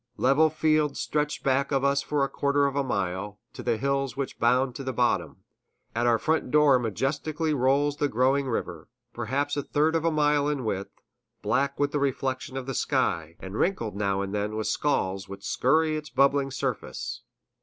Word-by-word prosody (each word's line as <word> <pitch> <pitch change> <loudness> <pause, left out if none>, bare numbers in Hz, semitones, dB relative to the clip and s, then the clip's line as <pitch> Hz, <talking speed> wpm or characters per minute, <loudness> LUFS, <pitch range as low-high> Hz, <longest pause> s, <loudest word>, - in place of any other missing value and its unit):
Level 140 +5 +4
fields 155 -2 +1
stretch 150 0 -1
back 135 +1 +1
of 135 -1 +1
us 140 0 +2
for 145 0 0
a - - +2
quarter 140 +1 +1
of 140 -1 -1
a 140 - +1
mile, 100 -3 -3
to - - -8
the 120 -2 0
hills 135 -1 -1
which 140 -1 -4
bound 125 +2 +2
the 130 +1 -4
bottom; 125 -1 0 0.5
at 120 +1 +1
our 115 -1 +4
front 160 +1 0
door 145 -2 +5
majestically 145 - -1
rolls 140 +2 +2
the 145 - +1
growing 135 +3 +1
river, 120 - -4 0.3
perhaps 135 +5 -1
a 145 - 0
third 155 +3 +1
of 160 - +1
a 165 - +3
mile 150 -2 +2
in 140 -5 -2
width, 100 -2 -4 0.4
black 140 0 0
with 145 0 +1
the 145 - 0
reflection 135 -1 -2
of 130 - -4
the 135 - -4
sky, 80 -8 0
and 95 +2 -6
wrinkled 120 - 0
now 100 -1 0
and 100 0 -5
then 105 +1 -2
with 110 0 -2
squalls 95 -9 -1
which 100 0 -9
scurry 155 +5 +2
over 155 - 0
its 150 - -11
bubbling 135 +2 +2
surface. - - -4
135 Hz, 190 wpm, -27 LUFS, 120-145 Hz, 0.5 s, door